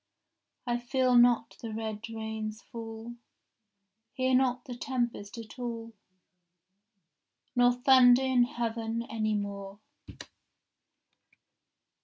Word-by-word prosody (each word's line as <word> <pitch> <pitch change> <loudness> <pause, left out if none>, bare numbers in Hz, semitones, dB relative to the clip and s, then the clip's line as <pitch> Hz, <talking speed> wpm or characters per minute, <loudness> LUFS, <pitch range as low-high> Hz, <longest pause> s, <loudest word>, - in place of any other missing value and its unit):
— - - -54
I 240 -1 0
feel 255 +1 +1
not 240 -1 +4
the 230 - -5
red 220 0 -5
rains 220 0 -5
fall, 230 0 -8 1.0
Hear 260 0 0
not 250 -1 +2
the 250 - -6
tempest 240 -5 -3
at 230 +2 -10
all, 230 -2 -5 1.6
Nor 245 0 +5
thunder 250 0 +6
in 255 -2 +3
heaven 230 -3 -3
any 215 -1 0
more. 200 -1 -5
235 Hz, 100 wpm, -29 LUFS, 220-245 Hz, 1.6 s, thunder